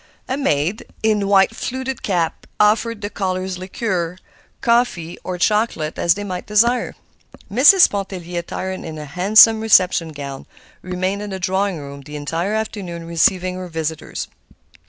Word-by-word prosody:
A 260 - -1
maid, 180 - -1 0.2
in 210 -2 +2
white 195 +2 +4
fluted 260 +1 -4
cap, 170 -5 -1
offered 220 +1 +2
the 205 - -3
callers 185 -1 -3
liqueur, 185 -2 -3 0.4
coffee, 235 -8 0
or 180 -1 -4
chocolate, 210 -5 0
as 170 - +3
they 205 - -5
might 185 -3 -5
desire. 235 +4 +2 0.6
Mrs. 295 - +7
Pontellier, 185 -3 -4
attired 185 +2 -5
in 160 -1 -7
a 150 - -7
handsome 210 +8 +5
reception 185 -6 +4
gown, 140 -3 -8 0.3
remained 185 +2 -2
in 210 - -5
the 190 -1 -5
drawing 190 0 0
room 140 -1 -9
the 150 +2 -10
entire 165 +8 -2
afternoon 195 -6 -4
receiving 180 +2 +1
her 185 0 -6
visitors. 160 -2 -4
185 Hz, 145 wpm, -20 LUFS, 170-210 Hz, 0.6 s, Mrs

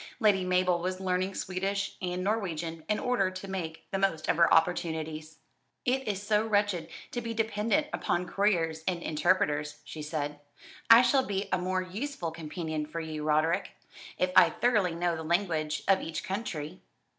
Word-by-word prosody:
Lady 205 -5 +4
Mabel 180 -1 +2
was 185 +1 -3
learning 185 +1 -1
Swedish 195 +2 -2
and 180 0 -2
Norwegian, 170 -6 -2
in 210 - +2
order 245 -7 +1
to 185 +1 -8
make 170 -4 -5
the 195 - -1
most 190 -5 0
of - - +2
her 170 -1 +5
opportunities. 160 -2 0 0.5
"It 265 +1 +1
is 200 -1 -2
so 210 +1 +2
wretched 205 -6 +1 0.2
to 240 - -3
be 230 0 -4
dependent 225 +6 +1
upon 175 +1 0
couriers 170 -6 +1
and 175 -2 -1
interpreters," 150 -2 +1
she 155 - -8
said. 150 -1 -3 0.5
"I 230 +2 +10
shall 265 +2 +4
be 195 0 -2
a 185 - +2
more 185 +1 -1
useful 195 - -4
companion 155 -1 -4
for 165 +2 -5
you, 155 -2 -5
Roderick, 155 +2 +1 0.4
if 185 0 +1
I - - +8
thoroughly 210 -8 +1
know 175 0 0
the 160 - -5
language 160 -3 0
of 195 -1 +4
each 160 -1 -4
country." 185 -5 -4
180 Hz, 170 wpm, -29 LUFS, 160-200 Hz, 0.5 s, I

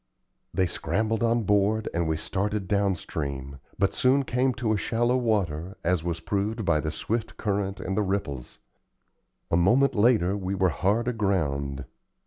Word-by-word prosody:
They 95 - +1
scrambled 105 +6 -1
on 115 0 +2
board, 105 +2 +2
and 85 -1 0
we 80 0 0
started 100 +3 -2
down 100 -1 +2
stream, 70 -4 -5 0.2
but 100 0 +1
soon 135 +2 +3
came 130 +1 +1
to 110 -2 0
shallow 120 +4 +1
water, 100 -7 -1
as 90 -2 +1
was 85 -1 -2
proved 105 +4 -2
by 85 -3 +3
the 75 - -2
swift 110 +8 -3
current 100 -2 -1
and 95 - -3
the 105 - +2
ripples. 95 -11 -3 0.9
A 85 - +4
moment 120 +11 +4
later 105 -4 +3
we 95 -1 -3
were 95 -1 +3
hard 105 +7 0
aground. 70 - -1
100 Hz, 155 wpm, -26 LUFS, 85-110 Hz, 0.9 s, A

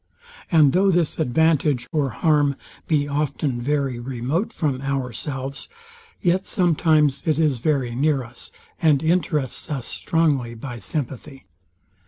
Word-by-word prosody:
And 155 -5 +5
though 195 +2 +4
this 170 -4 +1
advantage 150 -2 +2
or 145 -4 +1
harm 145 -2 +2 0.3
be 145 -3 +1
often 140 -3 -1
very 135 -2 -1
remote 130 - -2
from 140 -5 -2
ourselves, 135 0 -4 0.5
yet 180 +2 +2
sometimes 155 -7 +2
it 155 -2 +2
is 150 -6 +2
very 135 -3 0
near 140 +1 +1
us, 120 +1 -12 0.3
and 155 -3 +3
interests 155 -5 0
us 135 -6 -3
strongly 145 -8 0
by 120 +1 -7
sympathy. 135 - -5
145 Hz, 125 wpm, -22 LUFS, 130-160 Hz, 0.5 s, And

